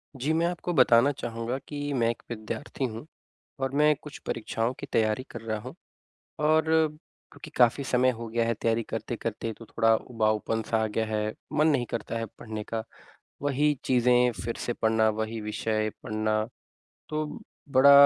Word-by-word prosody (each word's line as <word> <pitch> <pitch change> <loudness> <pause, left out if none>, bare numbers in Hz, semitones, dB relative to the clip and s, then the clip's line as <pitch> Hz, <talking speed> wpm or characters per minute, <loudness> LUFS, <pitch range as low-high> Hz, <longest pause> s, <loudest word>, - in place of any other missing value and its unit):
जी 135 +4 -1
मैं 165 +1 +2
आपको 175 0 -2
बताना 130 -1 +6
चाहूँगा 120 -1 -3
कि 150 - -6 0.2
मैं 115 -3 +2
एक 115 - -3
विद्यार्थी 120 +5 -4
हूँ 115 +4 -7 0.6
और 135 0 0
मैं 150 +1 +5
कुछ 150 -1 -9
परीक्षाओं 115 +1 -1
की - - -6
तैयारी 110 +2 +2
कर 120 - -7
रहा 110 -1 -2
हूँ - - -8 0.7
और 155 +1 +4 0.7
क्योंकि - - -11
काफ़ी 125 +3 +4
समय 130 0 +3
हो 115 -1 -5
गया 115 +1 +1
है 115 - +1
तैयारी 115 +1 +1
करते-करते 115 0 -3
तो 115 - -10
थोड़ा 115 0 +3
उबाऊपन 110 -1 0
सा 110 -1 +2
आ - - +1
गया 110 +1 -1
है 110 0 -1 0.2
मन 150 +1 +3
नहीं 130 -6 +2
करता 115 0 -3
है 115 - -2
पढ़ने 110 -2 -5
का। 110 -1 0 0.6
वही 145 +1 +2
चीज़ें 125 -1 +4
फ़िर 115 - -2
से 120 - +1
पढ़ना 110 -1 +2
वही 110 +1 -3
विषय 110 0 -1
पढ़ना 110 -1 0 0.7
तो 155 0 -1 0.4
बड़ा 135 +1 +7
115 Hz, 170 wpm, -28 LUFS, 110-130 Hz, 0.7 s, बड़ा